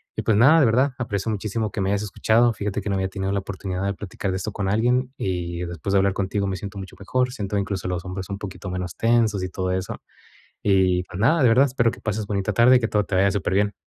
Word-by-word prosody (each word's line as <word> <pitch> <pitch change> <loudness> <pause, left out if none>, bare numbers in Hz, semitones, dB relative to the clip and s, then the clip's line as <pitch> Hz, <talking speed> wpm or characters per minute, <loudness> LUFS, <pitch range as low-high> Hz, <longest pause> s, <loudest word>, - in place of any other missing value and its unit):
Y - - -2
pues 105 -2 +2
nada, 150 +8 +7
de 145 - +5
verdad 130 +5 +3
aprecio 110 -2 -2
muchísimo 110 0 -2
que 100 - -3
me 95 - 0
hayas 100 0 0
escuchado. 115 +3 +2
Fíjate 105 -2 -3
que - - -4
no 100 - 0
había 95 0 -1
tenido 95 0 -3
la 100 - 0
oportunidad 95 -1 -5
de 100 - 0
platicar 100 0 -5
de 95 - -1
esto 100 +4 -4
con 95 -2 -2
alguien, 125 +4 +1
y 90 -2 -3
después 85 +3 -4
de 100 - +5
hablar 100 0 +2
contigo, 100 +1 -1
me 95 -1 -2
siento 100 +1 -7
mucho 95 -1 -9
mejor. 125 +6 0
Siento 100 -3 -3
incluso 100 -2 -2
los 90 0 -3
hombros 95 +1 -6
un 100 - -3
poquito 95 -1 -7
menos 90 -1 -4
tensos 115 -4 +2
y 95 - -3
todo 95 0 -2
eso. 95 0 -3 0.6
Y, 95 -2 +3
pues, 90 - -9
nada, 155 +7 +4
de 125 - +6
verdad, 130 +5 +5
espero 120 -3 +1
que - - -12
pases 110 -1 -3
bonita 100 0 -1
tarde 120 +4 +6
y - - +3
que 115 - -1
todo 105 -2 +1
te 100 - -4
vaya 100 +1 +4
superbién. 100 +1 0
100 Hz, 260 wpm, -23 LUFS, 95-110 Hz, 0.6 s, nada